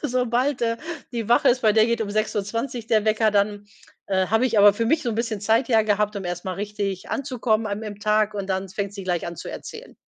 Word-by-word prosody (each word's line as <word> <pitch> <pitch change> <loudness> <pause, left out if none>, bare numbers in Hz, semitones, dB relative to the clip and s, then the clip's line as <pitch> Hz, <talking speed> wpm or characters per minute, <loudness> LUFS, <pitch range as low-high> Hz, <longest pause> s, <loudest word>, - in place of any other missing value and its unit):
sobald, 250 0 0
äh, 230 0 +1 0.3
die 230 -3 -4
wach 240 - +4
ist 250 +1 +4
bei 215 -3 +4
der 220 +1 +4
geht 235 0 0
um 220 - -2
6:20 215 +3 -2
der 220 -2 +2
Wecker, 215 0 +2
dann, 205 0 0 0.4
äh, 190 -1 +1
habe 225 +4 +3
ich 230 -4 +1
aber 205 0 +8
für 230 +3 -2
mich 310 +6 +2
so - - -2
'n 220 - -4
bisschen 225 -3 -2
Zeit 225 +4 +2
ja 225 -3 +4
gehabt, 210 0 0
um 200 -2 -5
erst 175 0 -4
mal 185 - -3
richtig 200 -1 -4
anzukommen 240 -5 -1
an 205 +1 -4
im 210 -2 -7
Tag 215 0 +1
und 200 -2 -4
dann 190 0 -2
fängt 200 +1 -4
sie 200 - -6
gleich 180 -2 -2
an 170 - -5
zu - - -8
erzählen. - - -9
215 Hz, 245 wpm, -23 LUFS, 200-230 Hz, 0.4 s, aber